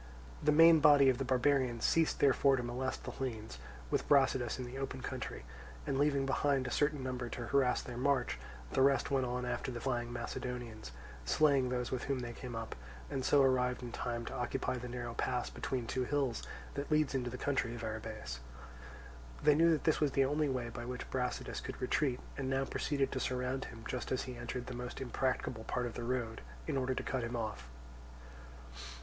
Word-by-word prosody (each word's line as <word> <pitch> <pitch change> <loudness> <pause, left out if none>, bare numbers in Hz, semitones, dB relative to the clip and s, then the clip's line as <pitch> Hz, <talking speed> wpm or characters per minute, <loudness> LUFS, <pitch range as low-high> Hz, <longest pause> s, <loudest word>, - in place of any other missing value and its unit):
The 150 - +4
main 165 +1 +8
body 145 -3 +7
of 130 -1 +1
the - - +1
barbarians 130 -2 +2
ceased 165 -1 +3
therefore 140 0 +5
to 125 - -2
molest 125 +2 -3
the - - -5
Hellenes 110 - -5 0.3
with - - 0
Brasidas 130 -4 +4
in 130 - -4
the 125 +2 -6
open 135 -1 -4
country, 130 - -5 0.4
and 135 - 0
leaving 140 -2 +3
behind 135 0 +2
a 125 - -3
certain 145 -2 +1
number 125 -2 -3
to 120 - -5
harass 135 -1 +2
their 120 -1 -7
march, 130 - +1 0.3
the - - +2
rest 135 -1 +4
went 135 -2 +2
on 125 0 -2
after 125 - -2
the 120 - -4
flying 120 -1 -1
Macedonians, 120 - -5 0.3
slaying 135 - +3
those 125 -1 -2
with 130 -2 -2
whom 135 -1 0
they 120 -1 -5
came 125 0 -7
up, 115 0 -4 0.4
and 130 - -1
so 140 +1 +5
arrived 125 -1 +2
in 120 - -5
time 120 -1 -3
to - - -5
occupy 125 +1 -1
the 125 0 -6
narrow 120 -1 -4
pass 125 0 -1
between 125 -3 -3
two 125 +2 -1
hills 135 -4 0 0.3
that 140 +1 -4
leads 155 -2 +3
into 125 -2 -1
the 125 - -5
country 130 -3 0
of 120 - -7
Arrhabaeus. 110 - -5 1.0
They 150 0 +7
knew 165 +3 +5
that 160 -2 +2
this 155 - +3
was 145 -3 +2
the 135 - +4
only 150 +2 +1
way 125 -3 -2
by 120 0 -6
which 125 +1 -5
Brasidas 125 -1 -2
could - - -6
retreat, 130 0 +1 0.2
and 130 -1 -1
now 135 0 +1
proceeded 140 0 0
to 130 - -2
surround 125 +1 -1
him 115 -1 -10
just 125 - -4
as 130 - +1
he 125 - -6
entered 120 +1 -4
the 130 - -6
most 125 0 -5
impracticable 130 -3 -1
part 125 0 -1
of 120 - -4
the 120 - -5
road, 120 -2 -2 0.2
in - - -2
order 130 -1 0
to - - -2
cut 130 -3 -1
him 120 +1 -3
off. 105 - -4
125 Hz, 205 wpm, -34 LUFS, 120-135 Hz, 1.0 s, main